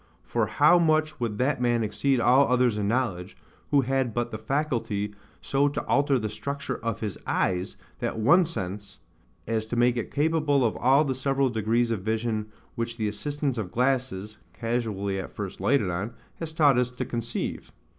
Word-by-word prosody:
For 115 Hz, -3 st, 0 dB
how 150 Hz, -, +5 dB
much 155 Hz, -2 st, +2 dB
would 115 Hz, -4 st, -2 dB
that 130 Hz, +2 st, 0 dB
man 120 Hz, -2 st, +2 dB
exceed 130 Hz, +5 st, +1 dB
all 125 Hz, +4 st, +5 dB
others 125 Hz, -3 st, +3 dB
in 105 Hz, -1 st, -1 dB
knowledge, 105 Hz, -6 st, -1 dB, 0.3 s
who 145 Hz, -1 st, +4 dB
had 130 Hz, -3 st, -1 dB
but 120 Hz, 0 st, -1 dB
the 110 Hz, -, -5 dB
faculty 110 Hz, -5 st, -1 dB, 0.3 s
so 140 Hz, +9 st, +2 dB
to 145 Hz, -, -3 dB
alter 140 Hz, -1 st, +3 dB
the 110 Hz, -3 st, -2 dB
structure 140 Hz, +6 st, -4 dB
of 115 Hz, -1 st, -2 dB
his 105 Hz, -4 st, -4 dB
eyes, 90 Hz, +1 st, 0 dB, 0.2 s
that -, -, -2 dB
one 145 Hz, +12 st, +5 dB
sense, 100 Hz, -, -6 dB, 0.5 s
as 110 Hz, -1 st, -1 dB
to 120 Hz, -, -3 dB
make 120 Hz, +1 st, +3 dB
it 120 Hz, -, -3 dB
capable 150 Hz, -3 st, +2 dB
of 110 Hz, -, 0 dB
all 135 Hz, +5 st, +4 dB
the 135 Hz, -, 0 dB
several 135 Hz, 0 st, +1 dB
degrees 115 Hz, +2 st, +1 dB
of 110 Hz, -4 st, -1 dB
vision 110 Hz, +1 st, -1 dB, 0.3 s
which 115 Hz, 0 st, -3 dB
the 110 Hz, -2 st, -1 dB
assistance 135 Hz, +5 st, -2 dB
of 100 Hz, -5 st, -3 dB
glasses 120 Hz, -4 st, -1 dB
(casually 110 Hz, -5 st, -2 dB
at 95 Hz, -, -7 dB
first 100 Hz, -3 st, -6 dB
lighted 130 Hz, -10 st, +2 dB
on) 95 Hz, +7 st, -4 dB, 0.2 s
has 165 Hz, -1 st, -4 dB
taught 145 Hz, -5 st, +4 dB
us 125 Hz, -1 st, +1 dB
to 125 Hz, -, -5 dB
conceive? 120 Hz, 0 st, -4 dB
120 Hz, 180 wpm, -26 LUFS, 110-140 Hz, 0.5 s, how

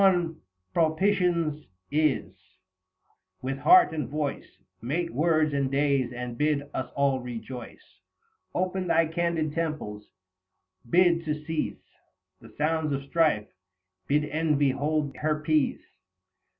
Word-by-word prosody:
The 195 Hz, -, +8 dB
dawn 170 Hz, -4 st, +1 dB, 0.3 s
propitious 170 Hz, -2 st, +1 dB, 0.3 s
is; 150 Hz, -1 st, +1 dB, 1.1 s
with 135 Hz, +1 st, -3 dB
heart 360 Hz, -, +6 dB
and 150 Hz, -6 st, -3 dB
voice 150 Hz, 0 st, -4 dB, 0.2 s
Mate 165 Hz, +9 st, -2 dB
words 155 Hz, +1 st, +2 dB
and 140 Hz, -1 st, +1 dB
days 140 Hz, -2 st, +1 dB
and 125 Hz, -1 st, -5 dB
bid 150 Hz, -1 st, +2 dB
us 130 Hz, -, -3 dB
all 140 Hz, -2 st, +2 dB
rejoice; 125 Hz, 0 st, -9 dB, 0.6 s
Open 185 Hz, 0 st, -1 dB
thy 165 Hz, -1 st, +4 dB
candid 165 Hz, -2 st, -1 dB
temples, 150 Hz, -11 st, -4 dB, 0.8 s
bid 170 Hz, 0 st, +4 dB
to 150 Hz, -1 st, 0 dB
cease 160 Hz, -1 st, -2 dB, 0.6 s
80 -, -, -44 dB
The 115 Hz, -, -13 dB
sounds 155 Hz, 0 st, 0 dB
of 135 Hz, 0 st, -2 dB
strife, 150 Hz, -8 st, +2 dB, 0.6 s
bid 150 Hz, +1 st, +2 dB
Envy 150 Hz, -2 st, +1 dB
hold 145 Hz, +1 st, -1 dB
her 150 Hz, 0 st, 0 dB
peace. 155 Hz, -1 st, +1 dB
150 Hz, 125 wpm, -27 LUFS, 140-165 Hz, 1.1 s, The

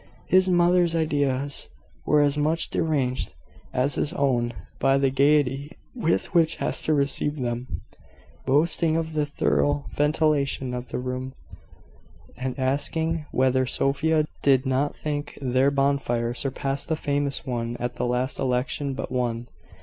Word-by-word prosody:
His 185 Hz, 0 st, +4 dB
mother's 175 Hz, -1 st, +3 dB
ideas 145 Hz, -3 st, 0 dB, 0.4 s
were 150 Hz, 0 st, +5 dB
as 145 Hz, 0 st, +2 dB
much 155 Hz, +3 st, 0 dB
deranged 130 Hz, -, -1 dB, 0.4 s
as 130 Hz, +3 st, +1 dB
his 155 Hz, -, -1 dB
own, 125 Hz, -7 st, +1 dB, 0.3 s
by 135 Hz, 0 st, +3 dB
the 135 Hz, -1 st, +2 dB
gaiety 140 Hz, +1 st, +2 dB, 0.2 s
with 195 Hz, -10 st, 0 dB
which 165 Hz, -3 st, +3 dB
Hester 155 Hz, -, 0 dB
received 140 Hz, 0 st, 0 dB
them, 120 Hz, +1 st, -3 dB, 0.8 s
boasting 160 Hz, +3 st, +2 dB
of 160 Hz, -1 st, -2 dB
the 150 Hz, -1 st, 0 dB
thorough 145 Hz, 0 st, +1 dB
ventilation 145 Hz, -3 st, +1 dB
of 125 Hz, -1 st, -5 dB
the -, -, -3 dB
room, 130 Hz, +1 st, -4 dB, 1.0 s
and 130 Hz, +1 st, -4 dB
asking 150 Hz, +4 st, -1 dB
whether 130 Hz, 0 st, +2 dB
Sophia 155 Hz, +4 st, +1 dB, 0.2 s
did 135 Hz, -1 st, +4 dB
not 135 Hz, +2 st, 0 dB
think 145 Hz, -1 st, -4 dB
their 130 Hz, +1 st, +2 dB
bonfire 135 Hz, -4 st, 0 dB
surpassed 135 Hz, +2 st, -2 dB
the 160 Hz, -, +1 dB
famous 145 Hz, -2 st, -1 dB
one 120 Hz, -2 st, -3 dB
at 120 Hz, 0 st, -3 dB
the -, -, -1 dB
last 125 Hz, +2 st, -1 dB
election 130 Hz, +2 st, -1 dB
but 135 Hz, -, -5 dB
one. 120 Hz, -2 st, -1 dB
140 Hz, 135 wpm, -25 LUFS, 130-150 Hz, 1.0 s, were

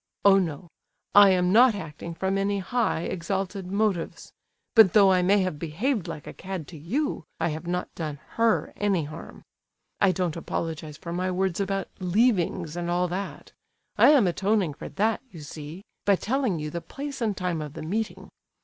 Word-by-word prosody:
Oh, 195 Hz, -1 st, +7 dB
no! 175 Hz, -1 st, -3 dB, 0.5 s
I 205 Hz, -1 st, +9 dB
am 180 Hz, -1 st, +3 dB
not 235 Hz, +2 st, +6 dB
acting 165 Hz, -2 st, -7 dB
from 190 Hz, +3 st, -1 dB
any 200 Hz, +1 st, 0 dB
high, 200 Hz, -1 st, 0 dB
exalted 190 Hz, +2 st, -3 dB
motives. 200 Hz, -3 st, -1 dB, 0.4 s
But 220 Hz, -6 st, +7 dB
though 200 Hz, -2 st, +7 dB
I 185 Hz, -1 st, +4 dB
may 195 Hz, +3 st, +4 dB
have 185 Hz, -6 st, -3 dB
behaved 185 Hz, -, -1 dB
like 160 Hz, -3 st, -7 dB
a -, -, -8 dB
cad 185 Hz, -5 st, -6 dB
to 165 Hz, -, -10 dB
you, 235 Hz, -, -2 dB, 0.2 s
I -, -, +1 dB
have 160 Hz, +2 st, -5 dB
not 180 Hz, +1 st, -2 dB
done 155 Hz, -3 st, -4 dB
her 230 Hz, -1 st, +1 dB
any 200 Hz, -5 st, +1 dB
harm. 155 Hz, +2 st, -9 dB, 0.6 s
I 195 Hz, -, +5 dB
don't 180 Hz, -3 st, -1 dB
apologize 160 Hz, -2 st, -4 dB
for 170 Hz, +2 st, -7 dB
my 185 Hz, +1 st, -1 dB
words 185 Hz, -1 st, -1 dB
about 195 Hz, 0 st, -1 dB
'leavings' 180 Hz, -4 st, +1 dB
and 175 Hz, 0 st, -3 dB
all 175 Hz, +1 st, +1 dB
that. 195 Hz, +3 st, -5 dB, 0.4 s
I -, -, +7 dB
am 285 Hz, -8 st, +6 dB
atoning 190 Hz, -1 st, +1 dB
for -, -, -8 dB
that, 220 Hz, +2 st, 0 dB
you 170 Hz, -8 st, -11 dB
see, 150 Hz, +5 st, -9 dB, 0.2 s
by 200 Hz, -, +4 dB
telling 240 Hz, -2 st, 0 dB
you 150 Hz, -1 st, -4 dB
the 170 Hz, -, -4 dB
place 280 Hz, +4 st, -7 dB
and 215 Hz, -4 st, 0 dB
time 180 Hz, -3 st, -2 dB
of 150 Hz, -2 st, -6 dB
the -, -, -7 dB
meeting. 215 Hz, +7 st, -3 dB
185 Hz, 185 wpm, -26 LUFS, 165-205 Hz, 0.6 s, I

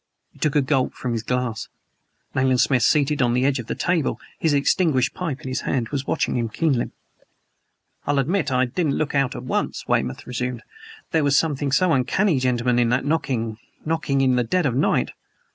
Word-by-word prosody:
He -, -, -22 dB
took 155 Hz, -2 st, 0 dB
a 145 Hz, -, +4 dB
gulp 130 Hz, -1 st, 0 dB
from 125 Hz, -, -4 dB
his 115 Hz, -, -1 dB
glass. 120 Hz, -1 st, -2 dB, 0.7 s
Nayland 130 Hz, -1 st, +2 dB
Smith, 130 Hz, -1 st, +3 dB
seated 145 Hz, +3 st, +2 dB
on 120 Hz, -1 st, +2 dB
the 125 Hz, +1 st, +2 dB
edge 135 Hz, -1 st, +2 dB
of 120 Hz, -, -7 dB
the -, -, -3 dB
table, 175 Hz, -4 st, 0 dB, 0.2 s
his 160 Hz, -, +2 dB
extinguished 140 Hz, -2 st, +2 dB
pipe 150 Hz, -6 st, -4 dB
in -, -, -8 dB
his 130 Hz, -, -2 dB
hand, 120 Hz, -4 st, -1 dB
was 140 Hz, -1 st, -3 dB
watching -, -, 0 dB
him 115 Hz, -2 st, -1 dB
keenly. 135 Hz, +1 st, 0 dB, 1.2 s
"I'll 145 Hz, 0 st, +1 dB
admit 155 Hz, +2 st, 0 dB
I 130 Hz, 0 st, +3 dB
didn't 140 Hz, +3 st, -1 dB
look 155 Hz, -, -1 dB
out 135 Hz, -3 st, +1 dB
at -, -, -6 dB
once," -, -, -2 dB
Weymouth -, -, -1 dB
resumed. 125 Hz, -1 st, -4 dB, 0.5 s
"There 160 Hz, -2 st, +2 dB
was 145 Hz, 0 st, +3 dB
something 145 Hz, -3 st, 0 dB
so 180 Hz, +5 st, +3 dB
uncanny, 140 Hz, +5 st, +2 dB
gentlemen, 125 Hz, -1 st, +1 dB
in 120 Hz, -1 st, +3 dB
that 125 Hz, +3 st, +1 dB
knocking 120 Hz, -8 st, -1 dB, 0.3 s
knocking 155 Hz, -4 st, 0 dB
in 130 Hz, -2 st, +3 dB
the 125 Hz, -, +2 dB
dead 175 Hz, +9 st, 0 dB
of 130 Hz, -, +1 dB
the 130 Hz, -, 0 dB
night. -, -, +1 dB
135 Hz, 200 wpm, -23 LUFS, 125-150 Hz, 1.2 s, a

